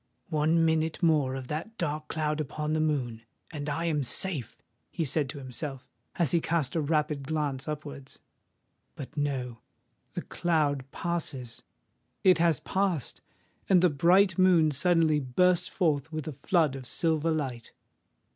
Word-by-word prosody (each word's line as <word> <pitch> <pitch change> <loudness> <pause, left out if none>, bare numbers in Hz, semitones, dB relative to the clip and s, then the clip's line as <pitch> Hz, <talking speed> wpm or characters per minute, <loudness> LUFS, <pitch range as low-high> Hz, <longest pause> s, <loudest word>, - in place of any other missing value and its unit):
"One 160 +2 +3
minute 160 +1 0
more 150 -5 +3
of 135 -1 -5
that 185 +10 -5
dark 150 -2 -2
cloud 155 -1 -1
upon 150 +1 -3
the 155 - +1
moon—and 145 0 -3
I 165 +3 -2
am 155 -3 +1
safe!" 130 - -1 0.3
he 165 - -2
said 140 0 0
to 145 - -6
himself, 130 0 -7 0.3
as 165 -7 +1
he 170 - +3
cast 160 -6 -1
a 165 - +2
rapid 150 -2 0
glance 150 -3 -2
upwards. 145 -3 -7 0.8
But, 135 - -9
no—the 130 -5 -5
cloud 145 -6 0
passes! 140 -9 -3 0.6
It 185 -3 +5
has 165 -4 +2
passed;—and 185 - -1
the 180 - +5
bright 180 +6 +4
moon 175 -4 +5
suddenly 160 0 +3
bursts 180 +7 +2
forth 160 -4 0
with 155 -1 -5
a 155 - -4
flood 155 +1 +1
of 130 -2 -7
silver 160 +4 +1
light. 135 -7 -3
155 Hz, 140 wpm, -28 LUFS, 140-165 Hz, 0.8 s, It